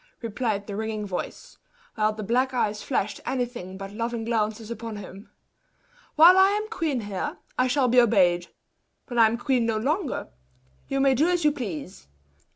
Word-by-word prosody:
replied 215 -2 -2
the 200 - -6
ringing 215 0 -3
voice; 185 -3 -6 0.3
while 215 -1 +1
the 215 0 -6
black 255 +5 +1
eyes 210 -3 0
flashed 210 -6 -2
anything 240 -8 -4
but 195 0 -7
loving 230 +1 -3
glances 220 -1 -2
upon 230 -1 -6
him. 200 +1 -10 0.9
"While 350 +4 +8
I 380 +1 +7
am 430 - -5
queen 315 - -1
here, 205 -3 -4 0.2
I 255 - +2
shall 255 0 +2
be 245 +1 +6
obeyed; 180 -7 +3 0.6
when 240 -1 -1
I 225 - +8
am 225 +2 -1
queen 245 -1 +1
no 225 -1 0
longer, 290 - -2 0.6
you 275 - -1
may 270 -1 +4
do 300 +7 +2
as 350 -3 +1
you 300 - +5
please! 190 - -6
230 Hz, 170 wpm, -25 LUFS, 210-260 Hz, 0.9 s, While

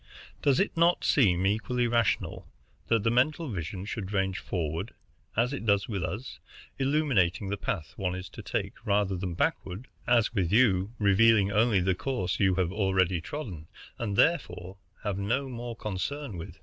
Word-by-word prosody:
Does 140 +1 +3
it 195 - 0
not 170 +1 +3
seem 95 -9 +3
equally 110 +5 +1
rational 115 -2 0 0.4
that 115 -3 +2
the 115 - +2
mental 150 +6 +1
vision 95 -1 -4
should 105 -2 -5
range 95 -2 0
forward, 85 +3 -3 0.4
as 120 +4 +2
it 140 - -4
does 100 -2 +2
with 100 -6 -3
us, 105 +9 -5 0.4
illuminating 125 - +1
the 100 - 0
path 85 -6 -4
one 90 -2 -1
is 95 0 -6
to - - -9
take, - - -4
rather 100 -1 +1
than 90 -1 -4
backward, 95 +6 -2 0.2
as 120 -2 +3
with 95 -6 0
you, 105 -4 +3
revealing 100 0 +4
only 105 -1 +3
the 95 +1 +2
course 95 0 -2
you 95 -3 +3
have 90 -2 0
already 95 -3 +1
trodden, 90 - -6 0.3
and 105 -4 -2
therefore 100 - +1 0.3
have 100 -2 -2
no 125 +8 0
more 120 -2 -6
concern 110 +5 -4
with? 90 +1 -8
100 Hz, 165 wpm, -28 LUFS, 95-120 Hz, 0.4 s, revealing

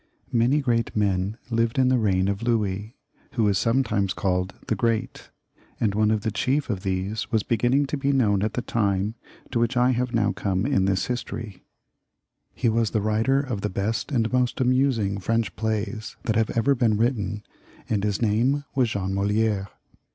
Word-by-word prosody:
Many 125 +4 +3
great 115 -4 0
men, 105 -2 +3
as - - 0
I 90 - -1 0.2
have - - -29
said, 115 - -2
lived 115 +1 +1
in 130 -1 +4
the 130 -1 +3
reign 95 -3 +2
,of 100 0 -1
Louis, 110 -1 -1 0.4
who 115 -4 +2
is 100 -1 +2
himself 115 - +1
sometimes 105 -7 +1
called 90 0 -1
the - - 0
Great, 115 -2 -1 0.5
and 105 -3 +1
one 105 +1 +2
of 110 -1 +1
the 110 0 -1
chief 130 +5 0
of 95 -3 -3
these 95 +2 -2
was 110 -3 +2
beginning 120 +5 +2
to 145 - -3
be 140 0 +1
known 105 -8 +2
at 110 +1 -1
the 125 - -2
time 100 -2 0 0.4
to 120 - 0
which 120 +2 +1
I 125 +1 +4
have 125 0 -1
now 105 -4 +2
come 95 +1 -1
in 130 -9 +2
this 95 -1 +1
history. 115 -5 -5 0.9
He - - 0
was 115 -1 +2
the 110 - 0
writer 110 +6 +2
of 125 -8 -4
the 105 - -1
best 105 +8 -2
and 115 -3 0
most 125 0 +1
amusing 125 -6 +2
French 115 +2 -1
plays 110 0 -3
that 110 - 0
have 110 0 +2
ever 115 +5 +3
been 115 -5 +2
written, 105 -3 -1 0.4
and 105 -3 0
his 105 +2 0
name 120 +7 +2
was 130 -4 +2
Jean 95 -3 -2
Moli^re. 100 0 +1
110 Hz, 200 wpm, -25 LUFS, 100-120 Hz, 0.9 s, in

